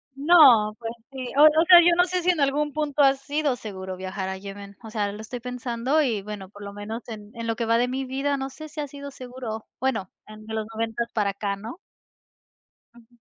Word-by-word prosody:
No, 275 -9 +6
pues, 225 -1 -4 0.2
sí, 260 -2 -6
o 295 - +8
o 310 +2 +6
sea, 355 -2 +10
yo 345 0 +5
no 355 +1 +4
sé 365 -1 -2
si 365 - +2
en 335 - -3
algún 290 +1 +1
punto 300 -1 0
ha 270 0 +6
sido 285 0 -1
seguro 190 -4 -7
viajar 190 0 -4
a 190 - -4
Yemen, 200 +1 -9
o 220 - -8
sea, 205 -2 -1
lo 210 +2 -8
estoy 240 +3 -6
pensando 250 +4 -1
y, 225 -8 0
bueno, 200 -2 -7
por 205 0 -12
lo 200 0 -7
menos 215 +3 -6
en 210 -2 -9
en 230 0 -5
lo 225 - 0
que 230 0 -2
va 230 +1 +3
de 245 +1 +2
mi 265 +1 -2
vida, 275 +2 -1
no 270 0 -4
sé 310 +3 -10
si 305 0 -9
ha 290 - -2
sido 280 0 -9
seguro, 245 -4 -7
bueno, 235 -8 -1 0.2
entre 215 +1 -9
los 215 -1 -2
noventas 230 +1 -2
para 205 -2 +1
acá, 200 0 -3
¿no? 225 - -9 1.2
Ujú. 240 0 -21
235 Hz, 230 wpm, -25 LUFS, 210-280 Hz, 1.2 s, sea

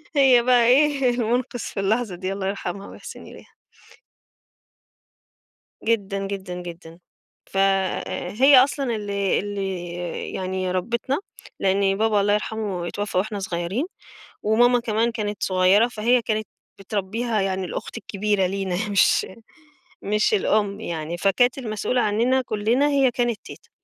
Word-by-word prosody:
هي 265 -4 +6
بقى 245 -1 +4
إيه، 275 +1 +4
المُنقِذ 245 +1 -1
في 205 - -5
اللحظة 210 0 0
دي، 185 +2 -3
الله 195 -1 -3
يرحمها 195 0 -4
ويِحسِن - - -10
إليها. - - -14 2.3
جدًا، 200 -3 -1
جدًا، 190 -2 -5
جدًا. 170 -1 -10 0.5
ف - - -7
آآ 195 -2 0
هي 265 +5 +6
أصلًا 270 -4 -2
اللي 200 -2 -1
اللي 195 -3 -4 0.5
يعني 185 0 -2
ربِّتنا، 235 +9 -1 0.4
لإن 195 0 +2
بابا 215 -1 +2
الله 205 +1 +2
يرحمه 210 -4 -2
اتوفّى 205 0 -3
وإحنا 205 +2 -1
صغيرين 185 - -2 0.6
وماما 240 +3 +4
كمان 230 0 0
كانت 210 -3 -4
صغيرة، 185 +4 +4
فهي 240 +1 +2
كانت 215 -1 -2 0.3
بتربّيها 210 +3 -2
يعني 190 -1 -1
الأخت 180 - -6
الكبيرة 205 -3 0
لينا 190 -1 -2
مش 200 -1 +3 0.8
مش 210 +2 +1
الأم 205 0 +1
يعني، 165 -2 -4
فكانت 200 +8 +2
المسؤولة 245 0 -1
عنّنا 235 +5 +2
كُلّنا 235 +4 +1
هي 275 -3 +3
كانت 240 -2 -1
تيتة. - - -12
205 Hz, 130 wpm, -23 LUFS, 195-235 Hz, 2.3 s, هي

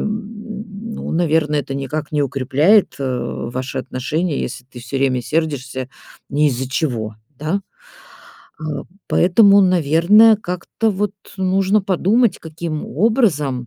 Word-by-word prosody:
ну, 215 0 -6
наверное, 160 -3 +1
это 135 -1 -6
никак 140 +3 -4
не 150 -1 +1
укрепляет, 140 - +3
э, 140 - -3 0.5
ваши 130 +1 -4
отношения, 140 +5 -2
если 125 - -5
ты 125 -1 -13
всё 120 +3 -5
время 135 -2 +1
сердишься 135 -4 -2 0.4
не 150 +2 +3
из-за 130 -1 -3
чего, 120 -7 -2 0.2
да? 160 +7 -1 1.0
А, 155 -1 -4 0.2
поэтому, 200 +2 +5
наверное, 185 +6 +5
как-то 180 +3 -2
вот 200 0 -1 0.3
нужно 190 +2 +2
подумать, 200 +5 +2
каким 160 -1 -5
образом 155 - +1
160 Hz, 120 wpm, -19 LUFS, 135-200 Hz, 1.0 s, поэтому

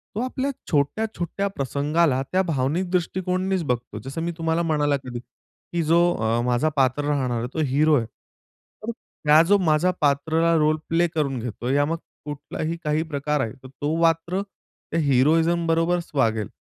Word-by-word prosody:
तो - - -2
आपल्या 260 +2 -2 0.2
छोट्या-छोट्या 180 +5 -1
प्रसंगाला 145 -3 0
त्या 185 - +3
भावनिक 165 +2 -1
दृष्टिकोनानेच 185 +1 0
बघतो. 120 -5 -3
जसं 135 +5 -5
मी 170 +1 -1
तुम्हाला 165 0 0
म्हणाला 150 -3 +1
कधी 125 -2 -6
की 125 +7 -7
जो 165 +2 +4 0.2
अ, 110 +2 0
माझा 125 +5 +2
पात्र 135 +1 +2
राहणार 130 -5 0
आहे 120 - -3
तो - - -3
हिरो 150 +3 +4
आहे. 115 - -1 0.8
तर 230 - -2 0.4
हा 155 +1 +8
जो 205 - +7
माझा 155 +4 +3
पात्राला 160 +4 +2
रोल 155 0 +3
प्ले 170 +1 +3
करून 150 -6 -2
घेतोय, 120 +3 -3
या 145 0 +3
मग 165 +3 -1 0.3
कुठलाही 150 +2 -4
काही 150 0 +1
प्रकार 150 -2 -1
आहे 110 -4 -3
तो 145 +4 -3
मात्र 165 +3 +2 0.5
त्या 165 - +1
हिरोइझम 160 +5 +3
बरोबरच 165 +1 +1
वागेल. 110 -7 +1
155 Hz, 160 wpm, -24 LUFS, 135-170 Hz, 0.8 s, हा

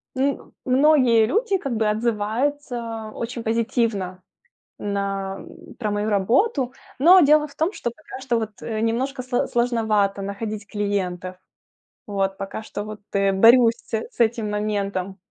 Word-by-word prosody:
ну, 270 +2 -1
многие 255 -4 +4
люди 400 - +1
как 275 -9 -4
бы 220 -1 +1
отзываются 230 +1 -2
очень 235 0 -5
позитивно 225 -5 -1 0.6
на 195 -1 -3 0.4
про 215 -4 -2
мою 205 +1 -1
работу. 250 - +2 0.3
Но 350 +7 +8
дело 300 -1 +5
в 285 - -17
том, 325 +5 0
что 235 - -3
пока 260 +1 -11
что, 255 -3 0
вот, 215 -2 -6
немножко 235 +4 -1
сло 250 -1 0
сложновато 220 -5 +1
находить 205 +1 -5
клиентов. 185 -3 -3 0.7
Вот, 195 -1 -1
пока 195 +2 -5
что, 205 -1 -6
вот, 215 0 -8
э, 195 0 +3
борюсь 230 +4 +6
с - - -21
с 225 +3 -4
этим 225 -2 +1
моментом. 200 -2 -2
225 Hz, 135 wpm, -23 LUFS, 205-250 Hz, 0.7 s, Но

